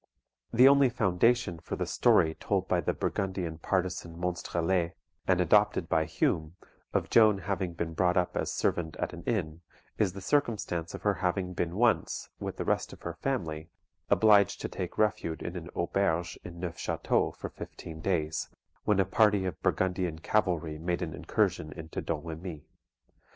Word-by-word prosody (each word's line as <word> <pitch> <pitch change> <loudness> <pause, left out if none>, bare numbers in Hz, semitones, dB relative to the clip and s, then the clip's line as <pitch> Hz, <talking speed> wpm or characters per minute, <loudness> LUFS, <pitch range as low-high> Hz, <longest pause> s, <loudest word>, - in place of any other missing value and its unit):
The 125 +3 +7
only 140 -1 +6
foundation 110 -3 +2
for - - -5
the - - -2
story 80 0 +3
told - - -1
by - - +2
the - - 0
Burgundian 95 -4 -2
partisan 90 -2 -2
Monstrelet, 85 0 -1 0.3
and 90 -1 +3
adopted 105 0 +3
by 80 -1 +2
Hume, 80 +1 0 0.4
of - - -1
Joan 110 -3 +6
having 95 -1 -2
been 85 -1 -3
brought 90 +2 +2
up 90 -1 +1
as - - -1
servant 80 -3 -1
at - - -3
an 85 - -8
inn, 85 -8 -1 0.4
is 95 -4 +2
the 100 - -7
circumstance 100 - -1
of - - -9
her 105 - +3
having 90 0 -1
been 85 0 -2
once, 115 +1 +1
with - - -5
the - - -3
rest - - 0
of - - -14
her 85 - -4
family, 80 -13 -3 0.4
obliged 105 -3 +5
to - - -2
take 90 - -5
refuge 95 -6 0
in 85 - -5
an 85 -1 -6
AUBERGE 85 -1 0
in 85 -1 -9
Neufchateau 85 -2 -1
for - - -6
fifteen 80 -1 -9
days, 80 -4 -1 0.4
when 105 -2 +3
a 95 - +4
party 105 0 +3
of 90 - -4
Burgundian 90 -3 0
cavalry 80 -4 0
made 85 +2 -1
an 80 -3 -4
incursion 75 - 0
into 80 0 -6
Domremy. 80 0 -5
90 Hz, 165 wpm, -30 LUFS, 80-100 Hz, 0.4 s, The